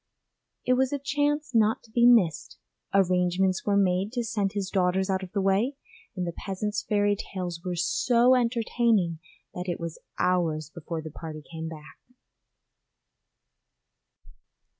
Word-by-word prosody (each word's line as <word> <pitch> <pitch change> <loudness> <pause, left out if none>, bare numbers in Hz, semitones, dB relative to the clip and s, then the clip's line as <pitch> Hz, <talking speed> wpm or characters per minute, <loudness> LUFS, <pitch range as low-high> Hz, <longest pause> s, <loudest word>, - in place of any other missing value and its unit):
It 255 - +3
was 260 0 +2
a 285 - 0
chance 290 +1 -1
not 220 -1 +3
to 225 - -20
be 235 +1 +5
missed; 200 -11 +3 0.3
arrangements 185 0 +2
were 200 -1 +3
made 190 +1 +2
to 240 -2 -1
send 210 -4 -1
his 195 -2 -3
daughters 190 0 +1
out 190 0 0
of 185 -1 -8
the 200 - 0
way, 200 +8 +1 0.4
and 180 -2 -2
the 170 - -4
peasant's 210 +2 -3
fairy 205 -1 +1
tales 180 -4 -5
were 180 -1 -3
so 235 +8 +3
entertaining 230 -7 +1 0.3
that 180 +1 -5
it 175 - -2
was 170 -1 -6 0.2
hours 160 -4 0
before 165 -1 -6
the 155 - -7
party 155 0 -8
came 160 0 -5
back. 155 -2 -11
195 Hz, 145 wpm, -27 LUFS, 175-230 Hz, 0.4 s, be